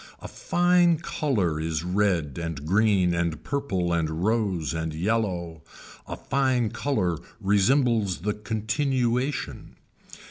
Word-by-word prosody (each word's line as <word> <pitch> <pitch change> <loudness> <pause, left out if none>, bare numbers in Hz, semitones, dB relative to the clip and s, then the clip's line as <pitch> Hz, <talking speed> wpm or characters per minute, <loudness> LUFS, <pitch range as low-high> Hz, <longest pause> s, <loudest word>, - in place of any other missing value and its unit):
A - - -8
fine 175 -1 +2
color 115 - -1
is 80 -1 -2
red 90 -6 0
and 80 -3 -5
green 95 -1 +3
and 85 -2 -2
purple 95 -12 -1
and 80 0 -1
rose 100 -8 0
and 80 -1 -3
yellow, 90 -4 -1 0.5
a - - -5
fine 130 -5 0
color 105 - -1 0.2
resembles 105 - +2
the 105 +3 -1
continuation. 120 +5 -2
100 Hz, 110 wpm, -25 LUFS, 85-125 Hz, 0.5 s, green